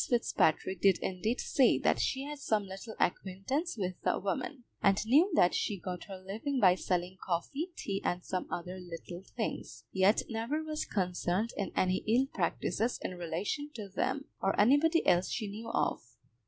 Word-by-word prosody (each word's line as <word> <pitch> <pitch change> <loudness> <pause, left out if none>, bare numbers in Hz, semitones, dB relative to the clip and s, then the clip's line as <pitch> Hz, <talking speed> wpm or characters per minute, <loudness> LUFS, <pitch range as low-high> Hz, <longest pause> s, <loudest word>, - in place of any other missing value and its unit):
Fitzpatrick 190 - +2
did 195 -2 +5
indeed 215 +6 -1
say 265 - +4
that - - +2
she 265 0 0
had 295 0 -6
some 215 -7 +1
little 195 +4 -8
acquaintance 215 - -1
with 185 -3 -1
the - - +2
woman, 250 +7 -3 0.2
and 195 +1 +3
knew 300 - +5
that 180 - +5
she 205 - 0
got 180 -1 -5
her 195 -2 -7
living 215 +9 -3
by 185 -5 +7
selling 180 0 -2
coffee, 270 - -2
tea, 195 -1 -3
and 175 0 -1
some 185 -1 -2
other 180 +2 -4
little 175 0 -8 0.2
things, - - -4
yet 190 +3 +4
never 235 +7 -2
was 310 -1 -3
concerned 185 +3 0
in 200 - -2
any 185 0 +2
ill 240 +5 +4
practices 235 +3 0
in - - -3
relation 180 - -3
to 210 -4 -6
them, 265 +8 -1 0.2
or 195 - +1
anybody 290 +9 +5
else 175 +1 +4
she 215 +1 -2
knew 215 +3 -6
of. - - 0
200 Hz, 170 wpm, -32 LUFS, 185-255 Hz, 0.2 s, by